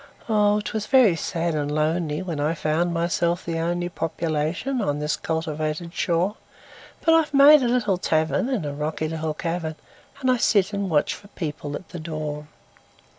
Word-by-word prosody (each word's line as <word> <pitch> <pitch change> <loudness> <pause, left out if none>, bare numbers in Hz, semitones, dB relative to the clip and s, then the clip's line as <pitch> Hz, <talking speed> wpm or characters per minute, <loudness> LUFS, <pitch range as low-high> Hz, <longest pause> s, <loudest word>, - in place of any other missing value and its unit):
Oh! 210 -2 +3
'twas 215 0 -3
very 250 -9 +5
sad 165 0 -2
and 145 -1 -1
lonelyWhen 155 +2 -1
I 150 +3 0
found 160 +3 0
myself 170 0 0
the 165 -1 -2
onlyPopulation 170 - -2
on 145 -6 0
this 150 0 -1
cultivated 160 +1 -3
shore; 180 +5 0 0.7
But 325 - +6
I've 320 -3 +3
made 285 +2 +8
a 250 - +1
little 220 -7 +1
tavernIn 175 - 0
a 145 - -3
rocky 155 +2 -2
little 160 -1 -3
cavern, 165 -1 -3 0.4
And 260 -2 +2
I 250 - +2
sit 205 -3 +2
and 200 -1 -2
watch 150 -3 +2
for 200 - -12
people 150 -6 -5
at 185 - -9
the 175 - -7
door. 155 -2 -5
170 Hz, 160 wpm, -24 LUFS, 155-200 Hz, 0.7 s, made